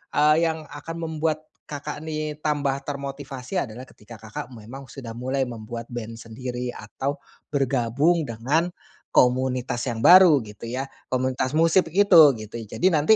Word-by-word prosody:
eee, 150 Hz, +1 st, +5 dB
yang 160 Hz, -1 st, -3 dB
akan 145 Hz, +3 st, -7 dB
membuat 155 Hz, -1 st, -1 dB, 0.3 s
Kakak, 150 Hz, +1 st, -5 dB
nih, 155 Hz, -1 st, -3 dB
tambah 140 Hz, -2 st, 0 dB
termotivasi 140 Hz, +1 st, -6 dB
adalah 125 Hz, +2 st, -9 dB
ketika 110 Hz, +1 st, -14 dB
Kakak 110 Hz, +4 st, -7 dB
memang 125 Hz, +4 st, -10 dB
sudah 115 Hz, -5 st, -8 dB
mulai 130 Hz, +2 st, -1 dB
membuat 115 Hz, 0 st, -7 dB
band 115 Hz, -1 st, -6 dB
sendiri 125 Hz, +2 st, -5 dB
atau 140 Hz, +2 st, -4 dB, 0.3 s
bergabung 140 Hz, +3 st, +1 dB
dengan 130 Hz, +9 st, 0 dB, 0.5 s
komunitas 125 Hz, 0 st, +2 dB
yang 115 Hz, -1 st, -3 dB
baru 175 Hz, -8 st, +8 dB
gitu, 105 Hz, +2 st, -10 dB
ya, 130 Hz, +3 st, -2 dB, 0.2 s
komunitas 130 Hz, +1 st, -1 dB
musik 165 Hz, +2 st, +4 dB
itu, 165 Hz, -6 st, +7 dB
gitu. 110 Hz, 0 st, -9 dB
Jadi 115 Hz, -, -1 dB
nanti, 160 Hz, +7 st, +5 dB
135 Hz, 140 wpm, -24 LUFS, 120-155 Hz, 0.5 s, baru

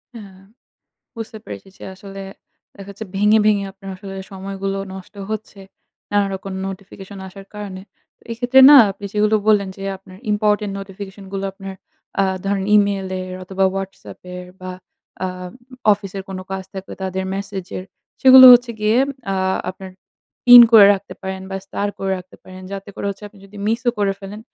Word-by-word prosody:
হ্যাঁ। 195 Hz, -4 st, -12 dB, 0.8 s
বুঝতে 220 Hz, -1 st, -7 dB
পেরেছি 195 Hz, -, -9 dB
যে -, -, -10 dB
আসলে 195 Hz, +1 st, -10 dB, 0.6 s
দেখা 200 Hz, -1 st, -11 dB
যাচ্ছে 200 Hz, +2 st, -8 dB
ভেঙে, 210 Hz, +2 st, +4 dB
ভেঙে, 205 Hz, -2 st, +3 dB
আপনার 195 Hz, 0 st, -12 dB
আসলে 195 Hz, 0 st, -9 dB, 0.2 s
সময়গুলো 195 Hz, 0 st, -4 dB, 0.2 s
নষ্ট 190 Hz, +1 st, -11 dB, 0.2 s
হচ্ছে। 215 Hz, -2 st, -6 dB, 0.5 s
নানা 205 Hz, -1 st, +3 dB
রকম 195 Hz, 0 st, -7 dB
notification 195 Hz, +1 st, -9 dB
আসার 195 Hz, +1 st, -13 dB
কারণে। 195 Hz, -2 st, -7 dB, 0.4 s
তো -, -, -31 dB
এক্ষেত্রে 245 Hz, +3 st, +4 dB
না 295 Hz, -, +10 dB, 0.2 s
আপনি 200 Hz, -, -13 dB
সেগুলো 215 Hz, +1 st, +2 dB
বললেন 200 Hz, -2 st, +3 dB
যে 195 Hz, -, -9 dB
আপনার 185 Hz, -1 st, -16 dB, 0.2 s
ইম্পোর্টেন্ট 210 Hz, -1 st, +1 dB
নোটিফিকেশন 195 Hz, 0 st, -9 dB
গুলো 195 Hz, 0 st, -3 dB
আপনার 195 Hz, 0 st, -9 dB, 0.5 s
আ -, -, +3 dB, 0.2 s
ধরেন 195 Hz, -1 st, -1 dB
Email 200 Hz, -2 st, +1 dB
এর 185 Hz, 0 st, -7 dB
অথবা 190 Hz, +1 st, -1 dB
WhatsApp 195 Hz, 0 st, -7 dB, 0.2 s
এর 180 Hz, -, -8 dB
বা 185 Hz, -, -6 dB, 0.5 s
আ -, -, +1 dB, 0.7 s
অফিসের 195 Hz, -1 st, -5 dB
কোন 190 Hz, -, -6 dB
কাজ 190 Hz, 0 st, -3 dB
থাকলে 190 Hz, 0 st, -7 dB
তাদের 190 Hz, 0 st, -3 dB
ম্যাসেজ 195 Hz, -2 st, -5 dB
এর 185 Hz, -, -7 dB, 0.4 s
সেগুলো 260 Hz, 0 st, +10 dB
হচ্ছে 245 Hz, 0 st, +5 dB
গিয়ে 215 Hz, +2 st, +2 dB, 0.4 s
আ -, -, 0 dB, 0.4 s
আপনার 190 Hz, 0 st, -11 dB, 0.6 s
পিন 245 Hz, 0 st, +12 dB
করে 210 Hz, -3 st, +10 dB
রাখতে 200 Hz, 0 st, -9 dB
পারেন 190 Hz, -1 st, -5 dB
বা 195 Hz, -, -3 dB
স্টার 205 Hz, +1 st, -3 dB
করে 195 Hz, 0 st, -2 dB
রাখতে 185 Hz, 0 st, -14 dB
পারেন। 185 Hz, 0 st, -12 dB
যাতে 195 Hz, +1 st, -7 dB
করে -, -, -4 dB
হচ্ছে 200 Hz, +1 st, -9 dB
আপনি 205 Hz, -, -20 dB
যদি 195 Hz, +1 st, -15 dB
মিস 230 Hz, +2 st, 0 dB
ও -, -, +6 dB
করে 200 Hz, -1 st, +1 dB
ফেলেন 200 Hz, +2 st, -8 dB
195 Hz, 170 wpm, -20 LUFS, 190-210 Hz, 0.8 s, পিন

